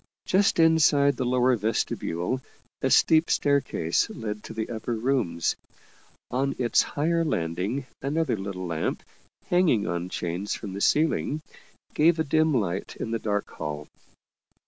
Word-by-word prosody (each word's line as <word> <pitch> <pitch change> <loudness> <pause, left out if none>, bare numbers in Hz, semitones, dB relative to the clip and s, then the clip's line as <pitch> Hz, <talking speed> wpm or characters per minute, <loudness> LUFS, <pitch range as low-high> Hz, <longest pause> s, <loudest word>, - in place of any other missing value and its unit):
Just 195 +2 +3
inside 150 -4 +5
the 125 - -2
lower 125 0 +3
vestibule 110 0 -2 0.4
a - - +1
steep 160 +1 +4
staircase 140 - +1
led 105 -1 -5
to - - -8
the 110 -1 -2
upper 115 +1 -3
rooms. 110 -9 0 0.8
On 135 +2 0
its 120 -2 +3
higher 165 +3 0
landing 95 - -2 0.2
another 150 +1 0
little 95 -2 -5
lamp, 85 -2 -2 0.4
hanging 175 - +2
on 85 -1 -3
chains 90 +3 -3
from 100 -4 -7
the 100 - -5
ceiling, 155 +1 +1 0.5
gave 165 +2 +4
a 160 - +1
dim 155 +2 +2
light 100 - -1
in 115 - -5
the 115 - -1
dark 105 -2 -1
hall. 75 0 -5
120 Hz, 140 wpm, -26 LUFS, 95-150 Hz, 0.8 s, inside